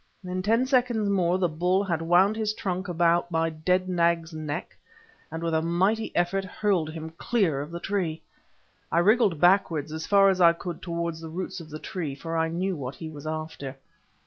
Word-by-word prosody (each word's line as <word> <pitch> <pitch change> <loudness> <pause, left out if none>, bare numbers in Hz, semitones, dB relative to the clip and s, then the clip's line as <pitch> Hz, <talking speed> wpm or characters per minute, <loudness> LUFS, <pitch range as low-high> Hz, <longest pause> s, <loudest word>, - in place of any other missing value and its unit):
In 185 0 -3
ten 225 +6 +2
seconds 245 -6 +2
more 180 -2 +2
the 185 -1 +2
bull 180 +5 +1
had 170 -5 -1
wound 180 +5 +4
his 215 -1 -1
trunk 185 -1 -3
about 175 0 +2
my 165 -1 0
dead 180 +4 0
nag's 170 -2 +1
neck, 155 -2 -5 0.5
and, 165 +1 -6
with 165 -1 -1
a 160 - +2
mighty 190 +7 +1
effort, 175 +3 +1
hurled 185 -4 0
him 160 0 -7
clear 190 - +1
of 145 - -6
the 170 +1 -6
tree. 175 -4 -2 0.7
I - - +1
wriggled 200 -2 +4
backwards 170 -4 +3
as 160 0 -5
far 195 -1 +6
as 185 -1 +1
I 170 -1 +7
could 170 0 -7
towards 170 -1 -3
the 160 - -7
roots 185 +3 -5
of 160 -2 -11
the 155 - -6
tree, 155 -4 -5
for 165 +3 -5
I 165 0 +2
knew 180 +3 -2
what 135 -3 -5
he 160 -1 -7
was 150 0 -9
after. 155 -4 -5
170 Hz, 200 wpm, -26 LUFS, 160-190 Hz, 0.7 s, I